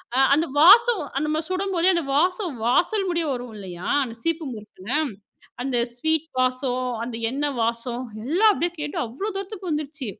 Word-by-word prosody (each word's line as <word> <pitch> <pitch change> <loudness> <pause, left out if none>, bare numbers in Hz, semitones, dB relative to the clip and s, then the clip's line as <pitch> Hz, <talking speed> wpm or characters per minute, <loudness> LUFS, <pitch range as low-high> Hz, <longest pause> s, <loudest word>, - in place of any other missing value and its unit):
அ - - +1 0.2
அந்த 320 +3 +1
வாசம் 425 +7 +7 0.2
அந்த 305 - -1
மாரி 315 0 -2
சுடும்போதே 370 -1 +1
அந்த 340 -3 -1
வாசம், 360 +2 +1
வாசல் 380 - +2
முடிய 340 -2 0
வரும் 245 -2 -6
இல்லையா? 185 -3 -6
அந்த 230 -3 -7
சீப்பு 330 -2 -1
முறுக்குல. 210 -2 -11 0.7
அந்த 260 -1 -1 0.2
ஸ்வீட் 315 +5 0
வாசம், 255 0 0 0.2
அந்த 235 -1 -5 0.2
எண்ணெய் 285 0 -2
வாசம். 235 +2 -2 0.2
எல்லாம் 380 +10 +4
அப்படியே 345 -2 -1
கேட்டு, 295 -1 -4
அவ்வளோ 265 - -5
தூரத்துக்கு 390 -1 -6
வந்துடுச்சு. 300 -2 -3
300 Hz, 160 wpm, -24 LUFS, 250-355 Hz, 0.7 s, வாசம்